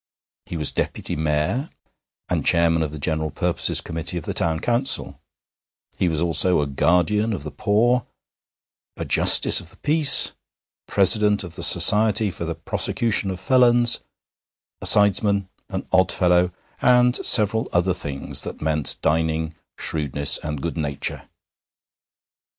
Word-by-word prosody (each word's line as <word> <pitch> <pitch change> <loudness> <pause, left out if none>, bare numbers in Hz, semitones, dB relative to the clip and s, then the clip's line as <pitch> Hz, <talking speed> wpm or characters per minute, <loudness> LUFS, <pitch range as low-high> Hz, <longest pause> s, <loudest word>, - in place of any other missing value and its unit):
He 85 - -6
was 75 -3 0
Deputy - - -4
Mayor, 75 - -2 0.6
and - - -2
Chairman 85 -1 +2
of 75 -2 -3
the 75 - -8
General 80 +1 -3
Purposes - - -1
Committee 80 +1 -5
of 85 - -7
the - - -4
Town 80 -1 -1
Council; 120 - -2 0.8
he 90 - +1
was 80 -2 -2
also 85 +1 +3
a 75 - -1
Guardian 90 +10 0
of 90 - -6
the 75 - -8
Poor, 110 - 0 0.9
a - - -5
Justice - - +4
of 85 - -7
the - - -19
Peace, 150 -2 +5 0.5
President 105 +1 +3
of 85 -3 -9
the 85 - -9
Society 105 +5 +4
for 85 - -6
the 85 0 -5
Prosecution 105 +5 -2
of 95 -1 -6
Felons, 120 0 +2 0.8
a - - +1
sidesman, 100 -1 +3 0.2
an - - -6
Oddfellow, 90 -1 +2 0.3
and 125 0 +3
several 110 0 +3
other 90 +1 0
things 70 -6 -4
that - - -6
meant 75 -2 -1
dining, 80 0 -1 0.2
shrewdness, 70 -2 0
and 75 -3 -7
good 85 0 -5
nature. 70 -3 -5
90 Hz, 140 wpm, -21 LUFS, 80-105 Hz, 0.9 s, Peace